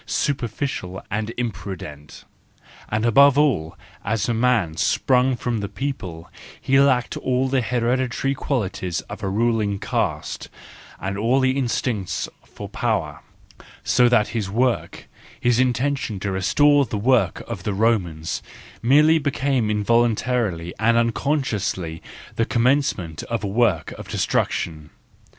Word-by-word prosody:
superficial 120 -8 -2
and 110 +2 -2
imprudent—and 95 0 -7
above 140 +4 +6
all, 125 - +1 0.3
as 110 -1 -1
a 120 - +1
man 115 -8 +1
sprung 125 - +2
from 120 -1 -2
the 100 -1 -4
people, 90 -12 -5 0.3
he 135 +1 +3
lacked 130 -3 +3
all 130 +1 0
the 130 0 +1
hereditary 125 +2 0
qualities 95 - -2
of - - -10
a 95 - -2
ruling 110 -1 +1
caste, - - -3 0.5
and 95 +1 -3
all 120 +5 +2
the 130 -1 +3
instincts 120 -6 -1 0.2
for - - -9
power; - - -2 0.6
so 125 -1 +4
that 115 -4 +3
his 105 -5 -3
work, 120 +4 -1 0.3
his 120 -1 +2
intention 130 -3 0
to 100 0 -2
restore 145 +10 +4
the 110 -4 -3
work 110 -4 +2
of 115 -5 -6
the 100 +2 -2
Romans, 95 -8 0 0.4
merely 150 +6 +5
became 135 -5 0
involuntarily 110 -4 +1
and 115 +2 +3
unconsciously 115 - -1 0.4
the 115 - +2
commencement 120 - +1
of 115 -3 -2
a - - -1
work 100 -4 +1
of - - -8
destruction. 75 -2 -1
115 Hz, 125 wpm, -22 LUFS, 100-130 Hz, 0.6 s, above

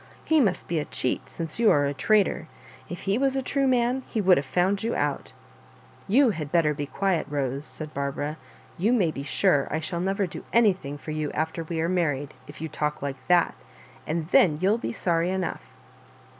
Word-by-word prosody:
" - - -26
He 320 -2 +4
must 195 -7 0
be 165 -2 0
a 150 - -3
cheat, 130 - -2
since 165 +3 -5
you 230 -2 +5
area 145 -1 +3
traitor. 200 -1 +2 0.4
If 175 - -6
he 200 +4 0
was 270 0 +1
a 270 - -1
true 275 +1 +1
man 250 0 +2
he 225 - -2
would 190 -3 +5
have 140 -1 -2
found 185 +7 +1
you 230 +1 -1
out" 145 -1 -2 0.8
You 250 +4 +5
had 155 -6 -5
better 165 -3 +3
be 145 -1 -4
quiet, 190 +1 -1
Bose," 140 0 -2
said 155 -1 -8
Bar 140 0 -2
bara; 145 +3 -4 0.2
" - - -26
you 215 +7 +3
may 190 -10 +2
be 140 - -6
sure 140 0 +2
I 155 - -1
shall 170 +2 -3
never 195 +2 0
do 175 - -8
any 230 -4 +5
thing 145 -5 -8
for 155 - -7
you 155 -1 -2
after 160 +1 -2
we 165 0 -4
are 165 - +1
married, 150 -6 -1
if 145 +1 -11
you 160 - -2
talk 150 -1 -3
like 135 -2 -5
that; 175 -1 +4 0.5
and 155 0 -2
then 165 -5 +5
you'll 200 +6 +2
be - - -3
sorry 170 -5 0
enough." 185 - -2
170 Hz, 215 wpm, -26 LUFS, 150-200 Hz, 0.8 s, you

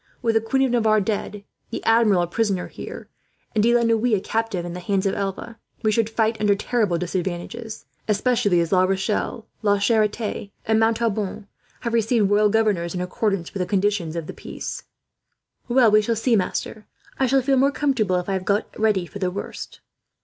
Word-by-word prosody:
With 230 - +2
the 225 - +3
Queen 265 +4 +1
of 260 - +1
Navarre 220 -3 +3
dead, 205 0 -3 0.3
the - - -5
Admiral 225 -5 +4
a - - -2
prisoner 195 -1 -1
here, - - -9 0.5
and 215 - +2
De 235 +2 +4
la 240 - +3
Noue 230 0 +2
a - - 0
captive 220 -4 -2
in 175 - -5
the 180 - -5
hands 195 +2 -1
of 195 - +1
Alva, 200 +3 -4 0.2
we 215 - +3
should 225 0 +1
fight 220 -1 0
under 205 -1 +4
terrible 210 -4 0
disadvantages; 185 +6 -4 0.2
especially 210 -3 +2
as 170 - -2
La 185 - +4
Rochelle, 195 +4 -1 0.2
La 205 -1 +3
Charite, 210 0 0 0.2
and 220 0 +2
Montauban 225 -3 0 0.4
have 235 -1 -3
received 225 -2 +2
royal 210 0 +4
governors, 200 -6 +1
in 180 - -2
accordance 185 -1 -2
with 195 - -3
the 180 - -1
conditions 195 -4 0
of 165 -2 -3
the - - -7
peace." - - -7 0.9
"Well, 240 -3 +5
we 215 0 +6
shall 230 +2 0
see, 230 +2 +2
master. 210 +2 -2 0.3
I 265 - +3
shall 265 +1 +3
feel 270 +1 +2
more 275 +2 +4
comfortable 255 -10 +1
if 180 -1 -1
I 195 - -1
have 190 -1 -2
got 205 +2 0
ready 210 -5 +2
for 200 - -9
the 185 -2 0
worst." 190 +3 -7
210 Hz, 195 wpm, -23 LUFS, 190-225 Hz, 0.9 s, we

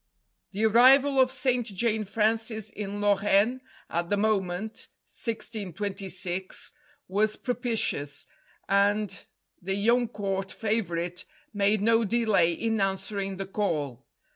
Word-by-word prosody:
The 205 +3 -1
arrival 265 +5 +6
of 255 0 +3
St. 255 -1 +1
Jane 220 0 -1
Frances 220 +1 0
in 205 0 -5
Lorraine 205 +4 +3 0.3
at 170 +1 -2
the 205 - +1
moment 205 0 -1 0.2
(1626) 190 -4 -4 0.3
was 210 +3 +1
propitious, 230 - -1 0.4
and 200 0 +1 0.3
the 195 +2 -2
young 235 +4 +3
Court 195 -3 -3
favourite 180 -6 -2 0.3
made 205 0 +2
no 225 +2 +4
delay 215 -5 +3
in 225 +4 -1
answering 195 0 -2
the 195 - -3
call. 150 - -2
205 Hz, 110 wpm, -27 LUFS, 195-225 Hz, 0.4 s, arrival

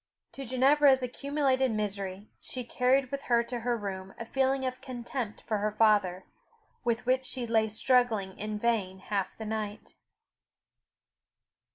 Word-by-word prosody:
To 275 - -7
Ginevra's 265 +2 +4
accumulated 265 0 +1
misery, 200 -2 -3
she 255 - -4
carried 255 +2 +2
with 280 0 -3
her 235 -1 +3
to 240 +1 -4
her 240 +1 0
room 195 -2 -6
a 230 - -6
feeling 265 +2 +1
of 255 0 -3
contempt 240 -3 -5
for 215 -2 -1
her 210 +1 0
father, 205 -4 +3 0.6
with 240 0 0
which 255 +1 +2
she 250 -1 -4
lay 220 -1 +2
struggling 220 -4 +2
in 210 0 -3
vain 210 -4 0
half 195 0 -3
the 220 - -6
night. 215 -1 -4
235 Hz, 145 wpm, -29 LUFS, 210-260 Hz, 0.6 s, Ginevra's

